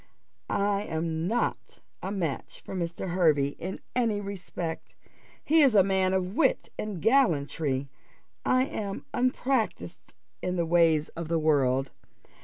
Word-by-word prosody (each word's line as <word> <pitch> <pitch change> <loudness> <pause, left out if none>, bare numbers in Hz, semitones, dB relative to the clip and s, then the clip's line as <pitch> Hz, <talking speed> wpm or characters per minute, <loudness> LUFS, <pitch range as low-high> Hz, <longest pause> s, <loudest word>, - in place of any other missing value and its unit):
I 200 0 +1
am 160 +1 -2
not 235 +4 -2 0.2
a 190 - -4
match 170 -8 -3
for - - -9
Mr. 175 0 -3
Hervey 155 -6 +3
in 185 +3 -5 0.2
any 230 -4 +1
respect. 180 -4 -6 0.5
He 320 +2 +5
is 270 -6 +5
a 195 - +7
man 190 -1 +2
of 185 0 -1
wit - - +2
and 210 -4 -3
gallantry 155 - +2 0.6
I 255 0 +3
am 210 -9 -4
unpractised 230 - -1 0.3
in 180 0 -1
the 170 -2 +1
ways 165 -2 +3
of 170 -1 -6
the 165 +1 +1
world. 135 -4 +2
180 Hz, 135 wpm, -28 LUFS, 160-205 Hz, 0.6 s, a